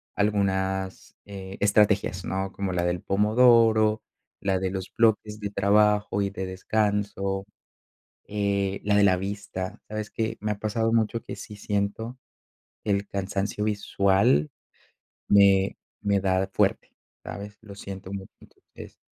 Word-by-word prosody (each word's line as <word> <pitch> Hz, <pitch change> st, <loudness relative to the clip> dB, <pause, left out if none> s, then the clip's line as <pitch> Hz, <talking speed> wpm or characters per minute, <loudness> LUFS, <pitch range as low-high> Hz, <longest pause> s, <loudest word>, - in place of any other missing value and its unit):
algunas, 95 Hz, -2 st, -1 dB
eh, 95 Hz, -1 st, -8 dB
estrategias, 100 Hz, -2 st, +2 dB
¿no?, 95 Hz, 0 st, -2 dB
como 100 Hz, -2 st, -3 dB
la 85 Hz, 0 st, 0 dB
del 90 Hz, 0 st, -1 dB
pomodoro, 110 Hz, +1 st, +4 dB, 0.4 s
la 95 Hz, -1 st, 0 dB
de 95 Hz, 0 st, -1 dB
los 95 Hz, -1 st, -3 dB
bloques 110 Hz, -2 st, +2 dB
de 100 Hz, -, -2 dB
trabajo 105 Hz, 0 st, +3 dB
y 100 Hz, -, 0 dB
de 95 Hz, -1 st, -4 dB
descanso, 100 Hz, 0 st, -1 dB, 0.8 s
eh, 100 Hz, -1 st, -1 dB
la 105 Hz, 0 st, +2 dB
de 105 Hz, -, +5 dB
la 95 Hz, -2 st, +5 dB
vista, 100 Hz, +1 st, -5 dB
¿sabes 110 Hz, 0 st, -5 dB
qué? 110 Hz, 0 st, -2 dB
Me 105 Hz, +1 st, -1 dB
ha 105 Hz, -, -6 dB
pasado 110 Hz, +2 st, 0 dB
mucho 115 Hz, 0 st, +1 dB
que -, -, -7 dB
sí 105 Hz, -, -9 dB
siento 105 Hz, +4 st, -2 dB, 0.7 s
que -, -, -2 dB
el 100 Hz, 0 st, 0 dB
cansancio 100 Hz, +1 st, -2 dB
visual 100 Hz, -7 st, +2 dB, 0.8 s
me 100 Hz, -1 st, +5 dB, 0.3 s
me 100 Hz, -1 st, +2 dB
da 95 Hz, 0 st, +1 dB
fuerte, -, -, +1 dB, 0.3 s
¿sabes? 100 Hz, +1 st, -8 dB
Lo 105 Hz, -3 st, -11 dB
siento 95 Hz, -1 st, -8 dB
mucho, 95 Hz, -1 st, -7 dB
entonces, -, -, -15 dB
100 Hz, 140 wpm, -26 LUFS, 95-105 Hz, 0.8 s, de